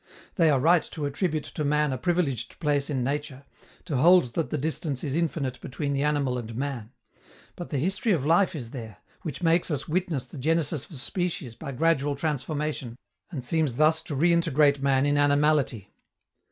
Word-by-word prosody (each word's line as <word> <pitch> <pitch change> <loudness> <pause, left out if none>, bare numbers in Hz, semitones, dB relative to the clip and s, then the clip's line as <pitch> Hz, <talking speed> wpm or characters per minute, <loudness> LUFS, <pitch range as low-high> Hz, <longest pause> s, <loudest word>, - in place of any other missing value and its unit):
They 165 -5 +3
are 140 -3 +3
right 165 +5 +5
to 150 - -3
attribute 155 +1 -1
to 155 - -5
man 150 -1 +1
a - - -2
privileged 150 -10 -1
place 145 -3 0
in 130 -4 -1
nature, 140 0 -3 0.4
to 155 -7 -2
hold 165 -3 +5
that 165 - -1
the 155 - -1
distance 150 -2 -3
is 140 -2 -2
infinite 150 -6 -2
between 140 +2 -3
the 140 - 0
animal 140 -4 +1
and 115 -1 -7
man; 130 -4 -4 0.6
but 175 - -7
the 145 - -2
history 190 - 0
of 155 -8 +1
life 175 +3 +3
is 120 -6 -6
there, 110 -7 -8 0.2
which 155 -1 -6
makes 165 +1 +3
us 150 -4 -2
witness 170 - -1
the 145 - -10
genesis 155 0 0
of 160 - -10
species 170 - -3
by 140 - -7
gradual 145 0 +1
transformation, 145 -4 -3 0.3
and 135 -8 -6
seems 155 -3 0
thus 155 +3 +4
to 145 - -4
reintegrate 150 -3 +3
man 135 0 +2
in 145 0 +2
animality. 145 -7 +2
145 Hz, 180 wpm, -26 LUFS, 135-165 Hz, 0.6 s, right